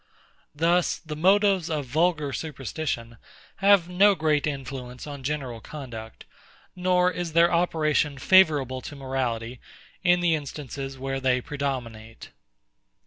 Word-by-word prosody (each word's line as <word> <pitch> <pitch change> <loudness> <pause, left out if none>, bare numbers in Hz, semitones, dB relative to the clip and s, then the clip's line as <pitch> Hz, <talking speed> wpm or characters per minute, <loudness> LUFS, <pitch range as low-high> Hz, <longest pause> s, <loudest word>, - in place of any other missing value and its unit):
Thus, 170 +3 +2
the 155 -1 -8
motives 190 +1 +3
of 150 -3 -2
vulgar 150 +1 0
superstition 135 -6 -4 0.4
have 195 -3 +4
no 195 +3 +4
great 155 -3 +1
influence 130 -3 -6
on 145 -2 -8
general 130 -4 -3
conduct; 115 -7 -9 0.5
nor 180 0 +2
is 175 -2 -4
their 170 +1 +4
operation 155 -4 +1
favourable 145 -6 +4
to 145 - -8
morality, 125 -3 -3 0.4
in 175 -1 +4
the 175 -2 +2
instances 140 -2 -5
where 135 +1 -3
they 130 -1 +2
predominate. 125 -6 -5
150 Hz, 120 wpm, -25 LUFS, 130-170 Hz, 0.5 s, have